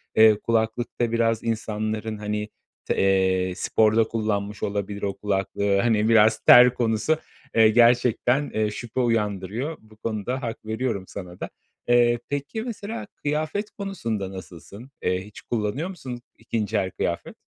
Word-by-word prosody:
eee, 110 -1 +6
kulaklıkta 115 +1 -1
biraz 115 -1 +1
insanların 110 -1 -2
hani 105 0 -3 0.4
te - - 0
eee, 95 -1 +2
sporda 110 +3 +3
kullanmış 105 -2 -2
olabilir 100 0 -3
o 100 -1 -1
kulaklığı. 100 0 0
Hani, 110 0 +2
biraz 110 -1 +5
ter 125 0 +8
konusu, 120 +6 +1 0.4
eee, 110 -1 +7
gerçekten, 120 +4 +3
eee, 110 -1 0
şüphe 120 +3 -5
uyandırıyor. 115 - -1
Bu 110 0 -20
konuda 115 +4 -3
hak 115 -3 -5
veriyorum 110 -3 -2
sana 90 -3 -9
da. - - -5 0.4
Eee, 120 0 +4
peki, 145 +10 -3
mesela 230 -2 -5
kıyafet 155 +8 -2
konusunda 115 - -4
nasılsın? 95 - -11
Eee, 95 +1 -1
hiç 105 - -12
kullanıyor 120 - -2
musun 130 -10 -7 0.2
2'nci 110 -1 -2
el 95 -2 -1
kıyafet? 85 -1 -3
110 Hz, 135 wpm, -24 LUFS, 105-120 Hz, 0.4 s, ter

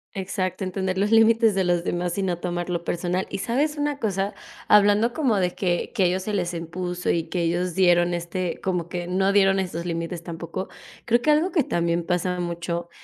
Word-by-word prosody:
Exacto, 190 0 -3
entender 190 0 -2
los 205 - +2
límites 225 -1 +5
de 190 - +2
los 175 -1 +1
demás 175 0 -2
y - - +1
no 180 -3 -1
tomarlo 175 -1 -3
personal, 175 +2 -1
y 195 - -3
¿sabes 285 +8 0
una 290 -1 -1
cosa?, 200 -4 -2 0.3
hablando 210 +3 +5
como 245 -6 +1
de 180 -1 0
que 175 -3 -1
que 200 -6 +1
ellos 180 +2 +1
se 210 +3 -4
les 180 -2 -1
impuso 175 +2 -4
y 165 - +2
que 180 - -1
ellos 175 +1 0
dieron 175 -1 +3
este 175 +1 -3
como 180 -3 -2
que 175 -1 -4
no 190 +2 +1
dieron 195 -1 +4
estos 175 -3 -3
límites 165 0 -3
tampoco, 170 +2 -6 0.4
creo 240 +1 +2
que 305 - +4
algo 320 +5 +2
que 315 - +2
también 170 -4 0
pasa 180 +1 -1
mucho 170 0 -3
180 Hz, 200 wpm, -24 LUFS, 175-200 Hz, 0.4 s, límites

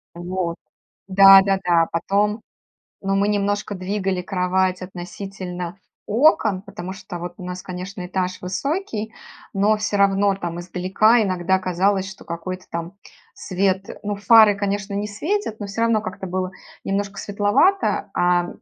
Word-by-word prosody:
Вот. 175 -1 -3 0.5
Да-да-да. 195 -3 +6
Потом, 205 +5 0 0.6
ну, 195 0 0
мы 200 +1 +2
немножко 205 0 -1
двигали 190 0 -2
кровать 185 0 0
относительно 180 0 -7 0.3
окон. 220 - +3
Потому 185 -1 -7
что 185 -2 -8
вот 175 0 -6
у 180 - -9
нас, 180 0 -5
конечно, 185 +1 -7
этаж 185 0 -3
высокий, 220 - -3 0.4
но 210 +2 +3
всё 210 -1 -1
равно 200 0 +3
там 175 -3 -5
издалека 190 +6 +2
иногда 185 -1 +1
казалось, 190 +2 0
что 195 - -13
какой-то 185 +2 -6
там 170 +2 -4 0.4
свет. 190 +1 -1 0.2
Ну, 205 0 -2
фары, 215 0 +6
конечно, 200 0 -2
не 205 +1 -2
светят, 295 - -2
но 205 - -5
всё 200 +3 -4
равно 230 -2 +3
как-то 190 -2 -6
было 185 0 -2 0.3
немножко 200 0 -2
светловато, 205 - +2
а, 175 0 +2
195 Hz, 135 wpm, -22 LUFS, 180-205 Hz, 0.6 s, Да-да-да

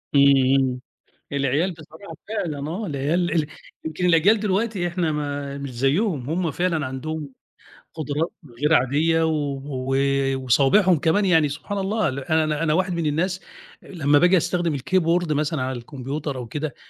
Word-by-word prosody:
إمم، 140 - +7 0.3
إمم 130 -2 0 0.5
العيال 140 +6 +1
بصراحة 160 +4 -12
فعلًا 165 -9 -3
آه، 200 +6 -4
العيال 155 +5 0
ال 155 -3 +1 0.4
يمكن 160 +3 -2
الأجيال 180 +6 +4
دلوقتي 200 -2 0
إحنا 170 -2 -1
ما 145 -1 -4
مش 140 -1 -6
زيّهم 140 - 0
هم 170 -1 -1
فعلًا 165 -3 -1
عندهم 145 +3 -5 0.6
قُدرات 155 +1 -2 0.3
غير 150 +2 +3
عادية 160 +5 +3
و 145 -3 -2
و 135 -2 -3 0.4
وصوابعهم 140 - +3
كمان 195 +7 +2
يعني 160 -5 +4
سبحان 200 +8 -5
الله 200 +1 0
ال 135 +1 -4
أنا 155 +1 0
أنا 155 -2 +2
واحد 185 +1 +1
من 170 -2 -2
الناس 180 +5 -1 0.4
آآ - - -16
لمّا 145 -4 +3
بآجي 180 +2 +5
أستخدم 170 -1 0
الكيبورد 170 +3 +1
مثلًا 150 -1 -1
على 130 0 -2
الكمبيوتر 140 +3 -5
أو 120 -2 -6
كده 150 +2 -4
155 Hz, 155 wpm, -23 LUFS, 140-175 Hz, 0.6 s, إمم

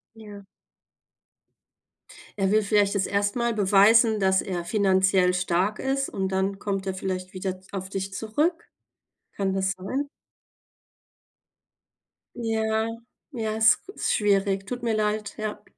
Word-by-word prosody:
Ja. 205 -2 -11 1.9
Er 195 -1 +1
will 215 0 +3
vielleicht 205 0 +2
jetzt 195 -2 +1
erst 205 +1 0
mal 235 -1 0
beweisen, 215 +2 +5
dass 190 -1 +3
er 175 -3 -4
finanziell 190 -1 +3
stark 185 +3 0
ist, 270 +1 -1
und 190 -1 -2
dann 190 +1 -1
kommt 195 -1 -3
er 190 - -2
vielleicht 185 -1 -4
wieder 185 0 -3
d 185 +1 -18
auf 190 -1 -5
dich 195 0 -4
zurück. 295 - -1 0.7
Kann 195 -1 0
das 190 0 0
sein? 260 +10 -3 2.3
Ja, 220 -1 -1 0.4
ja, 220 -4 -3
ist 220 - +4
g - - -22
ist - - -1
schwierig. 195 -2 +1
Tut 245 +3 -5
mir 230 -2 0
leid, 210 0 -1
ja. 215 -1 -5
200 Hz, 135 wpm, -25 LUFS, 190-220 Hz, 2.3 s, beweisen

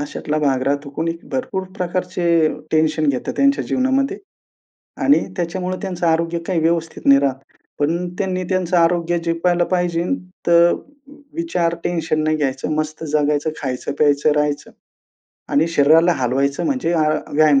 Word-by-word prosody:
अशातला 150 +1 -3
भाग 135 -4 +1
राहतो. 140 +1 -1
कोणी 165 +1 0 0.2
भरपूर 250 -7 -2
प्रकारचे 175 -3 +1 0.2
टेन्शन 155 0 +2
घेतं 130 -3 -1
त्यांच्या 275 0 +2
जीवनामध्ये 265 +1 +1 0.9
आणि 285 - +5 0.2
त्याच्यामुळे 180 +2 -2
त्यांचं 180 -3 -3
आरोग्य 165 +1 +1
काही 180 -3 +1
व्यवस्थित 165 0 -1
नाही 140 0 +7
राहत. 140 -2 0 0.4
पण 170 +5 0
त्यांनी 185 -2 -1
त्यांचं 185 -1 +1
आरोग्य 170 0 +2
जपायला 175 +1 +1
पाहिजे 175 -2 +1 0.4
तर 170 0 +5 0.6
विचार, 180 - 0
टेन्शन 165 -2 -1
नाही 155 0 +1
घ्यायचं, 135 -2 -2
मस्त 155 +1 -3
जगायचं, 150 0 +1
खायचं 130 -1 -3
प्यायचं 145 0 +3
राहायचं 150 -1 -1 0.8
आणि 155 +4 +3
शरीराला 165 +2 +4
हलवायचं 135 +3 0
म्हणजे 260 - 0
अ, 155 -3 +2 0.2
व्यायाम 150 -2 +4
165 Hz, 135 wpm, -20 LUFS, 150-180 Hz, 0.9 s, नाही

